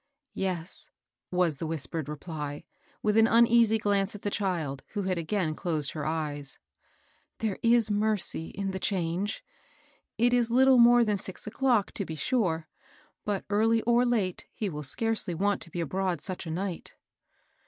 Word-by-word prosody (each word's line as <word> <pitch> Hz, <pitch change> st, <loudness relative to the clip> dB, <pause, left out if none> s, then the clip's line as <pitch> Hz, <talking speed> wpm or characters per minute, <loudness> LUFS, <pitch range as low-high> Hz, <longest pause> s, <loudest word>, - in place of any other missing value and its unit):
'* 290 Hz, -, -58 dB
" 275 Hz, -, -53 dB
Yes," 180 Hz, -1 st, -3 dB, 0.4 s
was 180 Hz, -5 st, +1 dB
the 165 Hz, -, -3 dB
whispered 160 Hz, -1 st, -3 dB
reply, 150 Hz, -1 st, -6 dB, 0.4 s
with 210 Hz, 0 st, +2 dB
an 225 Hz, 0 st, +6 dB
uneasy 230 Hz, -1 st, +5 dB
glance 205 Hz, -2 st, 0 dB
at 205 Hz, -, -10 dB
the 205 Hz, -, -1 dB
child, 165 Hz, -10 st, -2 dB
who 205 Hz, -2 st, -2 dB
had 185 Hz, -2 st, -1 dB
again 165 Hz, -1 st, -1 dB
closed 155 Hz, -4 st, 0 dB
her 150 Hz, -2 st, -4 dB
eyes, 150 Hz, -3 st, -3 dB, 0.8 s
^^ -, -, -54 dB
there 215 Hz, -4 st, -2 dB
is 230 Hz, -2 st, +4 dB
mercy 205 Hz, -5 st, +1 dB
in 195 Hz, -1 st, -4 dB
the 190 Hz, -, -4 dB
change 185 Hz, +2 st, -1 dB, 0.7 s
I 225 Hz, -, -1 dB
It 245 Hz, 0 st, +4 dB
is 240 Hz, -2 st, +2 dB
little 260 Hz, +1 st, +5 dB
more 240 Hz, 0 st, +7 dB
than 210 Hz, -3 st, 0 dB
six 190 Hz, -1 st, -7 dB
o'clock, 235 Hz, -1 st, +1 dB
to 200 Hz, -, -2 dB
be 160 Hz, -4 st, -6 dB
sure; 165 Hz, -, 0 dB, 0.6 s
but, 205 Hz, -2 st, -2 dB
early 225 Hz, +2 st, +3 dB
or 240 Hz, +1 st, +3 dB
late, 220 Hz, -7 st, -1 dB
he 210 Hz, -, -2 dB
will 150 Hz, -3 st, -5 dB
scarcely 210 Hz, -, 0 dB
want 200 Hz, +3 st, 0 dB
to -, -, -5 dB
be 175 Hz, -, -5 dB
abroad 185 Hz, +1 st, -1 dB
such 185 Hz, -2 st, -4 dB
a -, -, -4 dB
night." 180 Hz, +1 st, -4 dB
195 Hz, 175 wpm, -28 LUFS, 165-225 Hz, 0.8 s, more